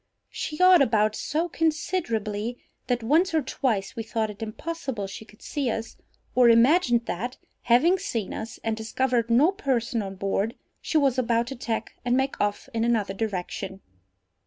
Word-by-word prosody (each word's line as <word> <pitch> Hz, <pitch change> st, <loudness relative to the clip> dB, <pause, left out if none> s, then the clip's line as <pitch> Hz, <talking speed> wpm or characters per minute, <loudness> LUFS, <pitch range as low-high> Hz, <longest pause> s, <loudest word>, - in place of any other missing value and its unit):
She 305 Hz, -, -4 dB
yawed 365 Hz, 0 st, +6 dB
about 215 Hz, -5 st, +3 dB
so 320 Hz, +4 st, -1 dB
considerably, 245 Hz, -, -1 dB, 0.3 s
that 245 Hz, -2 st, 0 dB
once 325 Hz, +9 st, +3 dB
or 315 Hz, -, +2 dB
twice 225 Hz, -7 st, -1 dB
we 230 Hz, -, -3 dB
thought 225 Hz, -1 st, -2 dB
it 205 Hz, -, -14 dB
impossible 250 Hz, -1 st, -4 dB
she 195 Hz, +3 st, -8 dB
could 215 Hz, 0 st, -19 dB
see 280 Hz, -5 st, -2 dB
us, 225 Hz, 0 st, -4 dB, 0.4 s
or 250 Hz, -1 st, +6 dB
imagined 240 Hz, 0 st, +4 dB
that, 245 Hz, +8 st, -4 dB, 0.2 s
having 310 Hz, +11 st, +4 dB
seen 225 Hz, -, -3 dB
us, 225 Hz, +1 st, -6 dB
and 225 Hz, -1 st, 0 dB
discovered 235 Hz, +1 st, 0 dB
no 270 Hz, +10 st, +5 dB
person 250 Hz, -, -1 dB
on 195 Hz, -1 st, -6 dB
board, 195 Hz, +3 st, -1 dB, 0.3 s
she 320 Hz, -, 0 dB
was 270 Hz, -4 st, +3 dB
about 235 Hz, -1 st, +1 dB
to 270 Hz, -, -5 dB
tack 230 Hz, -3 st, -3 dB
and 245 Hz, 0 st, +2 dB
make 265 Hz, 0 st, -1 dB
off 205 Hz, +3 st, -1 dB
in 225 Hz, 0 st, 0 dB
another 225 Hz, -4 st, +1 dB
direction. 195 Hz, -2 st, -4 dB
235 Hz, 165 wpm, -26 LUFS, 220-275 Hz, 0.4 s, yawed